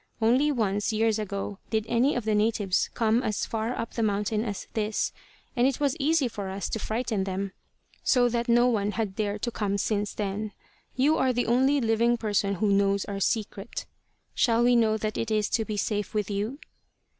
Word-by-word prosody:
Only 250 +7 +3
once, 205 -5 0
years 220 0 +1
ago, 200 -1 -4
did 220 -1 0
any 240 +5 +2
of 245 -3 -2
the 215 - +1
natives 210 -3 +1
come 225 0 +2
as 215 -5 -1
far 225 +2 -2
up 230 - -4
the 230 - -2
mountain 210 0 0
as 205 -4 -5
this, 215 -1 -1 0.4
and 245 0 +4
it 270 - -1
was 285 -2 +1
easy 300 -1 +2
for 205 -4 -5
us 195 +1 -4
to 225 - -2
frighten 220 -2 -1
them 195 0 -3 0.5
so 245 -2 +4
that 235 0 -1
no 240 +1 +5
one 210 -4 0
has 220 -2 -1
dared 205 +1 -3
to 240 - 0
come 200 -3 -1
since 205 0 -1
then. 205 +1 -3 0.4
You 290 +5 +3
are 260 - +3
the 245 0 0
only 265 +5 +3
living 235 0 +2
person 205 -3 0
who 205 +2 +1
knows 200 0 +2
our 200 -1 -4
secret. 210 0 -2 0.5
Shall 235 0 +3
we 245 0 +5
know 220 -2 +3
that 215 0 -3
it 230 - -2
is 215 -1 +1
to 225 - +1
be 215 -1 -4
safe 205 0 -2
with 210 -1 -1
you?" 210 +7 -2
220 Hz, 200 wpm, -27 LUFS, 205-240 Hz, 0.5 s, no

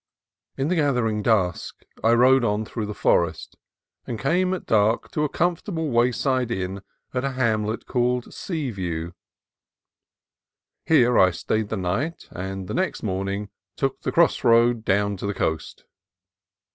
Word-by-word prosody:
In 135 - 0
the 180 - +1
gathering 125 -9 +1
dusk 100 -6 0 0.2
I 115 +1 +5
rode 130 +2 +5
on 105 -1 0
through 110 -1 -4
the 105 - -5
forest, - - +1 0.5
and 115 - -3
came 180 - +1
at 185 - -3
dark 110 +1 +2
to 150 - -1
a 150 - 0
comfortable 165 -1 -1
wayside 125 +1 +1
inn 95 -3 -3 0.3
at 125 0 -1
a 140 -1 -2
hamlet 110 -3 0
called 125 -1 -1
Seaview. 95 - -4 1.8
Here 125 -7 +4
I 95 - +6
stayed 105 +4 -2
the 110 - -2
night, 100 - -2
and 95 0 -5
the - - -5
next 190 +1 -1
morning 100 0 -2 0.3
took 135 -1 -2
the - - -2
cross 170 -1 +3
road 115 -1 +4
down 100 0 +1
to 100 - -4
the 100 - -2
coast. 80 -3 -3
115 Hz, 145 wpm, -24 LUFS, 100-135 Hz, 1.8 s, I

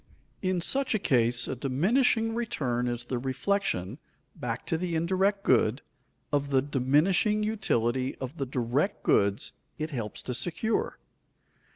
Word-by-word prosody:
In 185 -2 0
such 270 +5 +1
a - - +4
case 120 - +2
a - - -3
diminishing 225 - +2
return 130 - -1
is 120 0 -2
the 125 0 -2
reflection, 130 - -1 0.4
back 115 -1 -4
to - - 0
the 170 0 -2
indirect 190 +4 +1
good, 120 +1 +3 0.5
of 140 -1 +1
the 135 -1 +4
diminishing 150 - +2
utility 130 - 0
of 130 +5 -7
the 135 - -2
direct 130 - -1
goods 100 0 +2 0.3
it 155 +1 -4
helps 115 -6 -5
to 125 - -3
secure. 165 - -1
140 Hz, 140 wpm, -28 LUFS, 125-195 Hz, 0.5 s, a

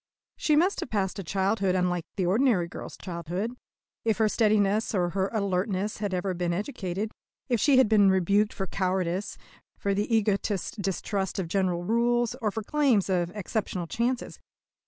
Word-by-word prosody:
She 305 - +2
must 360 +6 +3
have - - -4
passed 195 -3 -1
a - - -4
childhood 195 +1 +1
unlike 180 -2 0
the 185 - 0
ordinary 200 -2 +3
girl's - - -8
childhood, 180 +6 -4 0.5
if 220 -2 +1
her 220 -1 +3
steadiness 215 0 +2
or 175 -2 +1
her 190 +1 0
alertness 200 -1 -1
had 205 -2 -2
ever 185 +1 -1
been 175 -1 -1
educated, 200 0 -3 0.4
if 240 -2 +2
she 275 +4 +4
had 260 - +6
been 205 -2 +5
rebuked 200 +3 +3
for 195 - -3
cowardice, 185 +1 -1 0.4
for 200 - 0
the 205 +3 -1
egoistic 205 -1 0
distrust 195 +1 -2
of 190 -3 -2
general 180 -1 0
rules, 235 +3 +2
or 215 - +1
for 220 +1 -4
claims 250 -8 +2
of 175 -2 +1
exceptional 195 -2 -3
chances. 240 +7 -2
200 Hz, 165 wpm, -27 LUFS, 185-220 Hz, 0.5 s, had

